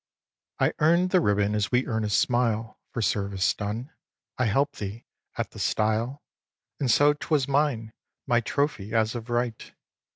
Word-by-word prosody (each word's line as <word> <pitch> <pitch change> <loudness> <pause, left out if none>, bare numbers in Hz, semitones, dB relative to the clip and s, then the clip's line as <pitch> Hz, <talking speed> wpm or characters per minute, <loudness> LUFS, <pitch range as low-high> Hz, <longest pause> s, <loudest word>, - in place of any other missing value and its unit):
x. - - +2
I - - -1
Earn'd 170 +3 +4
the 185 - +4
ribbon 105 -4 +2
as 105 -1 0
we 125 +1 +2
earn 110 -2 -1
a 105 - -1
smile 115 0 +1
For 115 - -2
service 100 -1 +1
done. 110 +8 -4 0.5
I 130 - +3
help'd 135 +7 +1
thee 105 +3 -6 0.3
at - - -2
the - - -11
stile; 110 +6 0 0.6
And 135 - 0
so 145 +5 +5
'twas 145 -2 0
mine, 135 -6 0 0.3
my 120 -2 +3
trophy, 120 -5 -2
as 110 0 +2
of 120 -1 -6
right. 120 -1 -2
115 Hz, 165 wpm, -26 LUFS, 110-140 Hz, 0.6 s, so